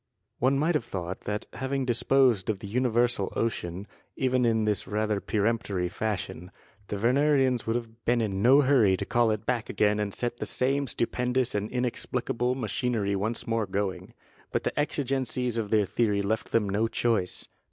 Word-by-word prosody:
One 135 +3 +3
might 155 +5 +2
have 150 -7 0
thought 90 -5 -5
that 105 +1 -3
having 130 +2 -2
disposed 125 -4 +2
of 110 - 0
the 100 - -10
universal 120 -2 +1
ocean, 95 -4 -2 0.3
even 130 -1 +1
in 110 -2 +2
this 105 -1 -1
rather 105 0 0
peremptory 100 -4 -1
fashion, 95 -3 -4 0.4
the - - -3
Wernerians 130 +2 +2
would 115 - +1
have 115 -1 -6
been 120 0 +2
in 100 -4 -1
no 135 +6 +6
hurry 125 -9 +4
to - - -3
call 120 -1 +2
it 110 -2 -2
back 120 -3 -1
again 105 0 +2
and 105 -1 -1
set 120 +3 -3
the - - -4
same 140 +2 0
stupendous 125 +1 0
and 105 +1 -2
inexplicable 125 0 -1
machinery 110 -3 -1
once 110 +4 -1
more 115 -2 0
going. 95 0 -3 0.4
But - - -1
the - - -2
exigencies 130 -4 -1
of 105 -2 -3
their 105 -1 +3
theory 105 -1 +1
left 110 +3 -2
them 110 -3 +2
no 105 +3 +1
choice. 115 -6 0
115 Hz, 175 wpm, -27 LUFS, 105-125 Hz, 0.4 s, no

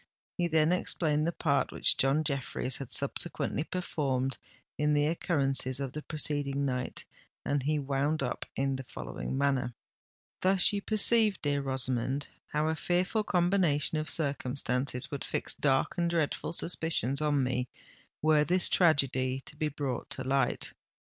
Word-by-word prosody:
He 175 - 0
then 160 0 +3
explained 155 -4 +1
the - - +1
part 145 -4 0
which - - +3
John 135 +4 +2
Jeffreys 135 -2 -2
had 135 - -8
subsequently - - +1
performed 135 -7 -2 0.4
in 150 0 +1
the 145 0 +3
occurrences 135 -5 0
of 135 -2 -4
the 150 - -4
preceding 145 -2 -1
night; 125 -2 -3 0.4
and 145 -1 0
he 150 +3 0
wound 140 +2 -1
up 125 - -3
in 135 0 0
the 130 - -6
following 65 - -6
manner:—— 135 -3 0 0.7
"Thus 190 +1 +3
you 200 - -1
perceive, 215 -1 +3
dear 145 -1 0
Rosamond, 130 0 -1 0.2
how 150 +1 -1
a 160 - +1
fearful 180 +6 0
combination 175 -6 +1
of 155 - -3
circumstances 130 -3 0
would 140 - -4
fix - - -2
dark 135 +4 +1
and 170 0 +1
dreadful 165 -1 -1
suspicions 160 -5 +3
on 145 -3 +2
me, 125 -1 -1 0.5
were 155 -1 +4
this 180 +3 +3
tragedy 135 -6 +2
to 145 - -11
be 155 0 -1
brought 140 -4 -4
to - - -2
light. 135 -1 0
145 Hz, 150 wpm, -30 LUFS, 135-160 Hz, 0.7 s, were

